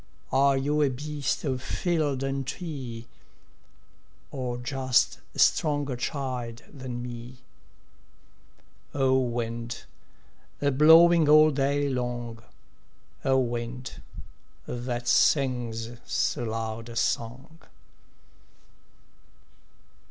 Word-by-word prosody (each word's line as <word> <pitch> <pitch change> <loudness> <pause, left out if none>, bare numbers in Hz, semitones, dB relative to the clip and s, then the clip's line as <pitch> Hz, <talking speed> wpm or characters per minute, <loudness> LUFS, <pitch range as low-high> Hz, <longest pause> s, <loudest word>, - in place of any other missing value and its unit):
Are 135 +1 +4
you 145 +3 +1
a 145 - +4
beast 145 +2 -3
of 130 -4 -2
field 150 -4 -1
and 135 -1 -2
tree, 130 -9 -6 1.3
Or 125 -3 -3
just 130 0 +1 0.2
a - - -10
stronger 145 -4 +2
child 125 -3 -4
than 130 -3 -6
me? 120 +1 -8 1.6
O 130 -1 +3
wind, 120 -1 -3 0.8
a 140 0 +2
blowing 160 +3 +7
all 155 +1 +7
day 140 +1 +1
long, 120 -3 -3 0.8
O 135 -1 +3
wind, 120 0 -3 0.6
that 120 0 -4
sings 120 -5 +2
so 120 - 0
loud 115 +1 -4
a 115 - -9
song! 125 +8 -2
130 Hz, 90 wpm, -27 LUFS, 120-140 Hz, 1.6 s, blowing